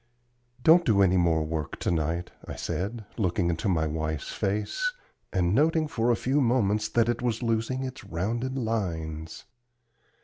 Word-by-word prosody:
"Don't 165 +4 +7
do 100 -7 +4
any 95 -1 +4
more 85 -3 +3
work 80 -1 -3
to - - 0
night," 85 +2 -1 0.2
I - - -5
said, 105 +4 -3
looking 90 -3 +1
into 85 +5 -1
my 80 -4 +2
wife's 80 -1 -3
face, 305 - -1 0.4
and 90 -1 +1
noting 155 +4 +3
for 120 -4 0
a 120 - +4
few 135 +5 +1
moments 110 -4 +2
that 115 +1 +2
it 120 -1 0
was 120 0 -1
losing 115 +3 0
its 130 0 -6
rounded 115 +8 -2
lines. 80 -9 -3
105 Hz, 160 wpm, -27 LUFS, 85-120 Hz, 0.4 s, Don't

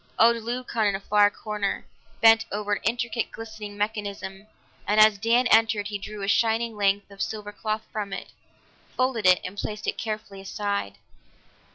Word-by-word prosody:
Old 235 +1 +6
Leucon, 235 -1 -1
in 200 - +1
a - - -3
far 205 +1 +4
corner, 210 -1 -3 0.4
bent 225 0 +6
over 210 0 -1
an - - -1
intricate, 235 +1 -1
glistening 220 -2 -8
mechanism, 205 -1 -4 0.4
and 210 +1 +3
as 215 -1 +6
Dan 230 +4 +3
entered 220 -2 +4
he 205 -1 -4
drew 205 0 -7
a - - -2
shining 225 +1 +2
length 200 0 +1
of 195 - -9
silver 210 -1 -4
cloth 215 +1 -3
from 205 -2 -4
it, - - -6 0.7
folded 255 -6 +1
it, 180 0 +6
and 200 +2 -6
placed 210 0 -4
it - - -2
carefully 215 -3 -5
aside. 200 - -3
210 Hz, 170 wpm, -26 LUFS, 200-225 Hz, 0.7 s, Old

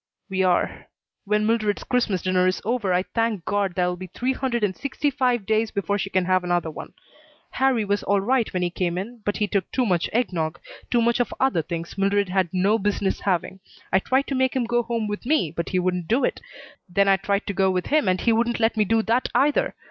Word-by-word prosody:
"We 190 0 0
are. 180 -2 0 0.4
When 210 +1 +1
Mildred's 215 -2 0
Christmas 235 -8 0
dinner 185 0 +2
is 185 - 0
over 225 -4 0
I 180 +1 +2
thank 225 -6 0
God 200 -3 0
there 180 - +2
will 180 - -1
be 185 +1 -8
three 250 +9 -2
hundred 250 -4 -2
and 190 -3 +1
sixty 280 +1 -2
five 250 -5 0
days 220 +1 +1
before 200 0 -1
she 195 - -2
can 185 -2 +1
have 185 0 +2
another 175 -2 0
one. - - -9 0.6
Harrie 260 -4 +1
was 205 0 0
all 200 0 +1
right 240 +3 +1
when 185 -2 -1
he 175 - -1
came 175 -1 -2
in, 225 +5 -6
but 205 - -1
he 210 - 0
took 200 -3 -1
too 255 - +1
much 180 -5 +1
egg 240 -3 0
nog, 160 -1 -2 0.3
too 240 -1 +2
much 235 +1 +2
of 245 - 0
other 265 -11 +2
things 170 +3 -6
Mildred 200 0 +2
had 185 -1 +1
no 195 +4 +2
business 200 -1 -1
having, 190 0 -1 0.3
I 190 - +6
tried 260 +7 +1
to - - -1
make 260 0 +1
him 260 - +1
go 240 +1 +1
home 230 -2 -2
with 210 0 -4
me, 250 - +1
but 170 +1 -4
he 185 - 0
wouldn't 180 -2 -1
do 240 +5 +2
it. - - -1 0.5
Then 200 +2 +2
I 195 -1 +5
tried 200 +1 -1
to 200 - -3
go 190 0 +2
with 185 -1 -1
him 300 -6 +2
and 185 0 +1
he 230 - +3
wouldn't 235 +1 +1
let 225 0 +2
me 215 - +3
do 225 +2 +2
that 235 +3 +1
either. 295 - +2
205 Hz, 240 wpm, -24 LUFS, 185-235 Hz, 0.6 s, I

